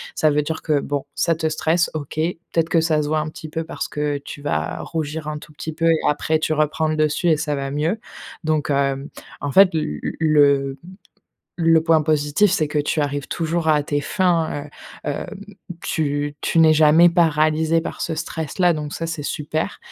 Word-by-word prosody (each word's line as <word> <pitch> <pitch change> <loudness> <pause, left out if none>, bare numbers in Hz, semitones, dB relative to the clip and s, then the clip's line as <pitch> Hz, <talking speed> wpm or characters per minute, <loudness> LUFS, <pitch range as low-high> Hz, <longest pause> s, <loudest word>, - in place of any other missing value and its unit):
Ça 155 - +3
veut 150 0 +2
dire 160 +1 -4
que, 150 -3 +1
bon, 145 -1 -3
ça 165 -1 +1
te 160 0 -1
stresse, 160 +2 +1
OK. 145 -3 -6
Peut-être 165 0 -1
que 165 - +3
ça 160 -2 +2
se 145 - -3
voit 155 +1 +1
un 155 0 -3
petit 155 - -9
peu 165 +1 -3
parce 165 - -5
que, 150 -1 -2
heu, - - -8
tu 145 - -9
vas 80 - -2
rougir 155 -1 -4
un 150 0 -3
tout 150 - -15
petit 160 - -6
peu 165 +1 0
et 165 - +4
après, 155 +2 +1
tu 155 0 0
reprends 155 +1 +1
le 155 - 0
dessus 155 +3 +1
et 155 - +4
ça 150 -2 -2
va 135 0 -4
mieux. 160 +9 -1 0.4
Donc 155 -1 0
hem, 140 0 0 0.3
en 145 - -2
fait, 195 +5 +7
l 155 - -1
l - - -2
le 140 -3 +3 0.9
le 165 -1 +5
point 160 -1 +4
positif, 150 +5 +2
c'est 160 -5 +1
que 150 - -1
tu 150 +1 0
arrives 145 0 -3
toujours 165 0 -1
à 150 -1 +4
tes 145 0 -1
fins, 165 -3 0 0.4
heu, 145 - -1
hem, - - -4 0.6
tu 145 -1 -1
tu - - 0
n'es 160 -1 +7
jamais 160 +3 +6
paralysé 160 -1 +2
par - - -6
ce 165 - -2
stress-là, 165 +2 0
donc 150 -2 -5
ça, 165 - -3
c'est 165 -2 -4
super. 150 +2 -3
155 Hz, 210 wpm, -21 LUFS, 145-165 Hz, 0.9 s, fait